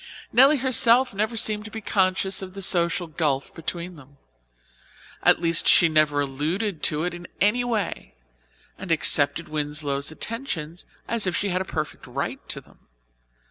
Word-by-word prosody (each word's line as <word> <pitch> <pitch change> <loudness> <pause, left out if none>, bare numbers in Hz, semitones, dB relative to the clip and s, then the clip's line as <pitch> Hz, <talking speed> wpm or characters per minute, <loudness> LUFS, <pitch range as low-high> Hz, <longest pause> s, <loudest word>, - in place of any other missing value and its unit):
Nelly 270 +6 +6
herself 255 -1 +3
never 215 +3 -2
seemed 215 -1 +1
to - - -7
be 220 - -7
conscious 190 -2 0
of 190 0 -9
the 195 - -4
social 175 -1 +2
gulf 150 -4 -2
between 170 +1 -6
them. 140 0 -17 1.0
At - - +4
least 170 -1 +1
she 170 - +6
never 155 -2 +2
alluded 155 +7 -3
to 150 +1 +2
it 180 - -2
in 175 0 -9
any 220 +5 +2
way, 220 - -3 0.6
and 190 -3 -6
accepted 150 -1 +3
Winslow's 150 -2 -2
attentions 175 - -5 0.2
as 230 -4 0
if 180 - -1
she 200 - -1
had 185 0 -1
a - - -4
perfect 155 -4 -5
right - - -4
to - - -3
them. - - -22
175 Hz, 160 wpm, -24 LUFS, 155-210 Hz, 1.0 s, Nelly